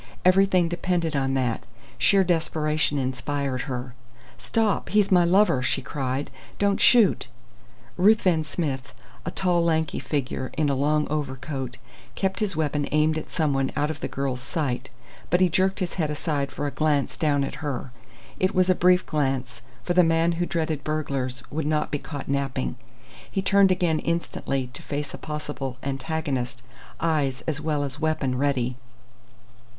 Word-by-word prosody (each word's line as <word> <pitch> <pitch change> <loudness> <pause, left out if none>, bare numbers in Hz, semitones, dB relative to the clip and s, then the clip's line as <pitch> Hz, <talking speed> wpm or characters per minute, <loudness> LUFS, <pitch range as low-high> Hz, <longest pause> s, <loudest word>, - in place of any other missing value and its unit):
Everything 185 -1 +5
depended 175 -2 -1
on 135 -1 +1
that. 125 -4 0 0.4
Sheer 195 -1 +5
desperation 155 -3 +1
inspired 130 0 -2
her. 125 -1 -4 0.5
"Stop! 220 -3 0
He's 205 -1 +3
my 180 -2 +6
lover!" 180 -5 +4
she 125 - 0
cried. 135 0 -3 0.3
"Don't 200 -1 +1
shoot!" 235 -6 +5 0.7
Ruthven 185 -4 +4
Smith 145 -4 -3 0.3
a - - +2
tall, 180 -2 +1
lanky 160 -2 +1
figure 130 -3 -2
in 150 -2 +2
a - - +2
long 150 +2 +2
over 145 -3 -2
coat 130 -2 -5 0.4
kept 190 +1 -1
his 210 -5 -1
weapon 150 -2 0
aimed 155 +1 +3
at 155 - -5
someone 135 -4 0
out 150 +1 +1
of 150 - -7
the - - -3
girl's 135 -2 -3
sight, 135 -3 -2 0.4
but 175 - +3
he 185 -1 +4
jerked 190 +3 +2
his 185 - -1
head 160 -5 -1
aside 145 -2 -2
for 145 - -4
a 145 - -1
glance 150 -2 +1
down 145 -3 +1
at 135 - -5
her. 135 -3 -3 0.5
It 185 - +1
was 185 0 +4
a - - +6
brief 180 +1 +4
glance, 135 -5 -1 0.2
for 175 - 0
the 180 0 +6
man 165 +1 +3
who 175 +1 -1
dreaded 160 -4 -1
burglars 135 -5 -2
would 150 0 -2
not 150 0 0
be 145 - -1
caught 145 -2 -7
napping. 135 - -1 0.5
He 195 - -2
turned 200 0 +5
again 175 -4 +2
instantly 135 -6 -2
to - - -8
face 145 -1 -4
a - - -7
possible 145 -4 -5
antagonist, 135 -3 -3 0.4
eyes 145 -6 0
as 150 -2 -3
well 150 -2 0
as 140 0 -4
weapon 155 -5 0
ready. 130 -3 0
150 Hz, 165 wpm, -25 LUFS, 135-170 Hz, 0.7 s, my